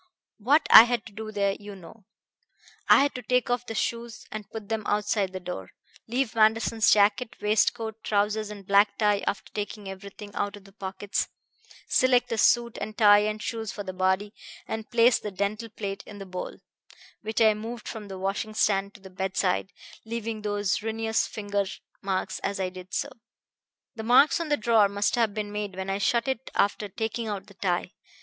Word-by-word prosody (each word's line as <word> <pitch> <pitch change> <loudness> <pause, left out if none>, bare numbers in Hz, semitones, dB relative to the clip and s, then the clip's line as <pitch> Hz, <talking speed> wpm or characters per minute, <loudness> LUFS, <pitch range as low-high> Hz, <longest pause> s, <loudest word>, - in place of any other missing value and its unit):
"What 285 +8 +3
I 225 - +12
had 240 -2 -1
to - - -11
do 215 +1 -6
there 200 -2 0
you 205 -1 -9
know. 190 +3 -14 0.8
I - - +8
had 285 - 0
to 250 - -6
take 250 +1 +1
off 245 0 -1
the 225 - -5
shoes 235 +1 -3
and 215 -2 -7
put 220 -2 -8
them 220 0 -1
outside 205 -2 0
the 185 - -5
door, 175 - -6 0.4
leave 245 +1 -1
Manderson's 225 0 +3
jacket, 210 +3 +3
waistcoat, 220 +1 0
trousers 210 +1 0
and 205 -2 -9
black 200 +1 +4
tie, 210 -2 +2
after 200 - -3
taking 210 -1 -5
everything 200 +2 -9
out 200 0 -2
of 205 - -13
the 195 - -17
pockets, 195 0 -3 0.6
select 250 -1 +3
a 225 - -1
suit 235 0 +3
and 215 0 -5
tie 205 -2 +7
and 215 +1 -2
shoes 225 -2 -3
for 205 - -6
the 190 -1 -6
body, 190 +3 0 0.3
and 220 0 -5
place 235 0 +4
the 210 - -5
dental 205 +4 -3
plate 200 -2 -5
in 205 - -10
the 195 - -8
bowl, 185 -1 -6 0.6
which 220 0 -3
I 220 -2 +6
moved 225 +2 -7
from 215 -2 -6
the 190 -1 -7
washing 200 +3 -3
stand 200 -1 +1
to 200 - -14
the 190 -1 -12
bedside, 190 0 -1 0.3
leaving 225 -1 -4
those 205 -1 -1
ruinous 225 0 0
finger 205 -1 -2 0.4
marks 190 -1 -2
as 200 0 -3
I 185 -1 0
did 185 0 -11
so. 285 - -1 0.8
The 225 - -6
marks 250 +8 +5
on 335 -2 -3
the 295 - +2
drawer 220 -2 +4
must 200 +1 0
have 225 -4 +1
been 210 -1 -3
made 205 -2 -4
when 190 +1 -3
I 195 - -1
shut 235 +4 +1
it 265 -1 -2
after 205 +1 +1
taking 225 +3 -3
out 205 -3 -4
the 200 - -16
tie. 180 -2 -1
210 Hz, 195 wpm, -27 LUFS, 200-225 Hz, 0.8 s, I